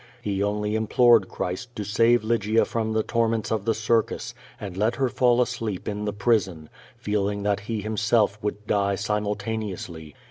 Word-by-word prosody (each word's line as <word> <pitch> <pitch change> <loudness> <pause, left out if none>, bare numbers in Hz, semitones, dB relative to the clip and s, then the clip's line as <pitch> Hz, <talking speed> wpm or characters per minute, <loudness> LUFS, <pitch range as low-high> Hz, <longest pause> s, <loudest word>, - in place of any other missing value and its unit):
He 100 -5 -2
only 105 +1 -1
implored 110 -1 +4
Christ 105 +7 -5
to 105 - -3
save 115 +3 +3
Lygia 110 0 +2
from 115 -2 -2
the 110 0 +1
torments 115 -3 0
of 110 -2 -1
the 115 -1 +1
circus, 110 +1 0 0.3
and 95 -3 -6
let 110 +5 +1
her 135 -2 +1
fall 125 -1 +3
asleep 115 -6 -4
in 105 0 -3
the 105 - -1
prison, 100 -7 0 0.3
feeling 100 -1 -1
that 100 0 +1
he 105 +1 -4
himself 105 0 +1
would 105 0 -4
die 100 -1 +1
simultaneously. 105 -6 -3
105 Hz, 165 wpm, -25 LUFS, 100-115 Hz, 0.3 s, implored